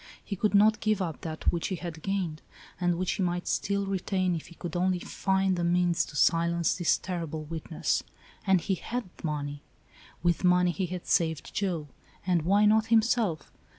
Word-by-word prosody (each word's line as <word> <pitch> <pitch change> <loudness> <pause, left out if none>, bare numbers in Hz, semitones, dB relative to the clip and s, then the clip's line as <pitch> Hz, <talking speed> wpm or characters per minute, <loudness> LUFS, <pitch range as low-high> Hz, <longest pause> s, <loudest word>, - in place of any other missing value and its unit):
He 200 - -3
could 210 +2 +1
not 215 +1 +5
give 215 -2 +1
up 170 -5 -3
that 160 -1 -1
which 170 - -2
he 190 - -2
had 170 -2 -7
gained, 180 -5 -2 0.4
and 175 -1 +2
which 185 0 0
he - - -2
might 175 -1 -1
still 200 0 0
retain, 185 -1 0
if 160 - -6
he 170 - -14
could 175 -1 -6
only 180 +1 +2
find 190 +1 0
the 175 - -2
means 175 0 +2
to - - -12
silence 170 +2 +2
this 175 -2 +2
terrible 165 -4 -4
witness. 160 +1 -2 0.5
And 190 -2 +4
he 190 - -1
had 240 +6 -3 0.2
money. 145 -2 -3 0.6
With 175 +1 +1
money 180 0 +4
he 185 +1 -2
had 180 0 -6
saved 160 -3 0
Joe, 180 -7 -1 0.4
and 180 -2 +2
why 200 +6 +4
not 220 +1 +4
himself? 220 - +2
180 Hz, 185 wpm, -28 LUFS, 165-195 Hz, 0.6 s, not